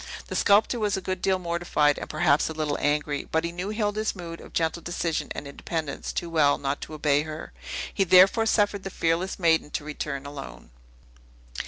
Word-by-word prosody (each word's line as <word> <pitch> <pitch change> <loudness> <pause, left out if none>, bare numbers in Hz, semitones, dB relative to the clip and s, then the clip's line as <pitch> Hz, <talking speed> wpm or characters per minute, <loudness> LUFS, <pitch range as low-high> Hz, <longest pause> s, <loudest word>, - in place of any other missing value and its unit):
The - - -4
sculptor 215 +4 +4
was 210 -3 +1
a - - -1
good 185 -1 -4
deal 190 -1 +2
mortified, 170 -4 +1
and - - -7
perhaps 155 -1 +2
a - - -4
little 155 -2 -1
angry: 145 -1 0
but 160 0 +1
he 170 - -2
knew 180 +3 -4
Hilda's 215 0 -1
mood 170 -2 -8
of - - -13
gentle 165 +1 0
decision 170 -1 -2
and 145 - -6
independence 155 +1 -4
too 170 - -3
well 155 -4 +3
not 140 0 -2
to 155 - -7
obey 145 -1 +2
her. 155 0 -7 0.4
He 195 - +2
therefore 190 +5 +6
suffered 205 -2 +2
the 195 - -5
fearless 170 +1 0
maiden 165 -4 +2
to 150 - -4
return 145 -2 -4
alone. 140 - -9
165 Hz, 190 wpm, -26 LUFS, 150-190 Hz, 0.4 s, therefore